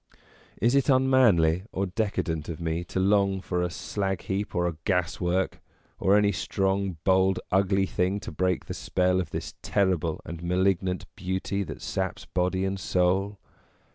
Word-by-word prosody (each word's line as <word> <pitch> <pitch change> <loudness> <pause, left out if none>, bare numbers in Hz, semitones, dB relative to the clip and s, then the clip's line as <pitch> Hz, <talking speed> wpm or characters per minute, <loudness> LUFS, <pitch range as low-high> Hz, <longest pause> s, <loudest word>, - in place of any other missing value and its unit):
Is 120 +5 +3
it 140 +1 +2
unmanly 125 -11 +4
or 95 - -1
decadent 90 -6 -2
of 85 - -5
me 85 0 -2
to 95 - -3
long 100 0 +3
for 90 -1 -2
a 90 - 0
slag 95 +1 -3
heap 100 +2 -3
or 90 0 +1
a 85 -3 -4
gaswork, 90 0 0 0.4
or 100 +2 +4
any 105 -1 +3
strong, 95 0 -1
bold, 95 0 +3
ugly 95 0 +3
thing 95 +2 0
to - - -7
break 90 +3 0
the - - -5
spell 90 0 +1
of 85 - -6
this - - -5
terrible 90 -6 0
and 85 0 -7
malignant 90 +1 0
beauty 95 0 -2
that - - -8
saps 95 -1 -3
body 90 +2 0
and 95 0 -2
soul 95 +3 +1
95 Hz, 160 wpm, -27 LUFS, 90-100 Hz, 0.4 s, unmanly